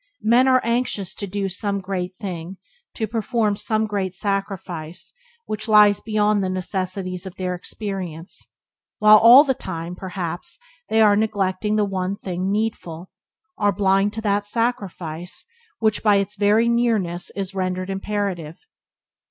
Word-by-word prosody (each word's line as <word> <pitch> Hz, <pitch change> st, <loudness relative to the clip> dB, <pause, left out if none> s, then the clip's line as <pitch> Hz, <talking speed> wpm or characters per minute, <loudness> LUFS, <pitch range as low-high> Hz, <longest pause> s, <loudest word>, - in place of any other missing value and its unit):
Men 240 Hz, +4 st, +4 dB
are 255 Hz, -1 st, +5 dB
anxious 235 Hz, -5 st, -1 dB
to 200 Hz, -, -5 dB
do 200 Hz, +1 st, -2 dB
some 200 Hz, +1 st, -2 dB
great 185 Hz, -1 st, -4 dB
thing, 185 Hz, -1 st, -6 dB, 0.4 s
to 220 Hz, -, -1 dB
perform 225 Hz, -1 st, 0 dB
some 215 Hz, +1 st, -1 dB
great 195 Hz, -3 st, -3 dB
sacrifice 190 Hz, -5 st, -4 dB, 0.3 s
which 215 Hz, +2 st, -4 dB
lies 210 Hz, -2 st, +6 dB
beyond 210 Hz, -2 st, +1 dB
the 185 Hz, -, -1 dB
necessities 185 Hz, 0 st, -3 dB
of 185 Hz, -, -9 dB
their 185 Hz, -1 st, -2 dB
experience, 180 Hz, -2 st, -6 dB, 0.5 s
while 215 Hz, 0 st, +7 dB
all 240 Hz, +6 st, +9 dB
the 270 Hz, -3 st, +1 dB
time, 175 Hz, -8 st, -6 dB
perhaps, 180 Hz, -2 st, -5 dB, 0.3 s
they 220 Hz, 0 st, +3 dB
are 210 Hz, -2 st, +6 dB
neglecting 210 Hz, -1 st, 0 dB
the 210 Hz, -1 st, +2 dB
one 190 Hz, 0 st, -2 dB
thing 185 Hz, -1 st, -3 dB
needful, 190 Hz, -5 st, -3 dB, 0.5 s
are 205 Hz, -1 st, +3 dB
blind 195 Hz, 0 st, +2 dB
to 220 Hz, -, -4 dB
that 205 Hz, -1 st, 0 dB
sacrifice 190 Hz, -7 st, -3 dB, 0.3 s
which 220 Hz, -2 st, +1 dB
by 210 Hz, -2 st, +4 dB
its 200 Hz, +1 st, 0 dB
very 210 Hz, +3 st, +3 dB
nearness 220 Hz, -7 st, 0 dB
is 195 Hz, 0 st, -4 dB
rendered 185 Hz, 0 st, -2 dB
imperative. 195 Hz, -, -4 dB
200 Hz, 145 wpm, -22 LUFS, 185-215 Hz, 0.5 s, all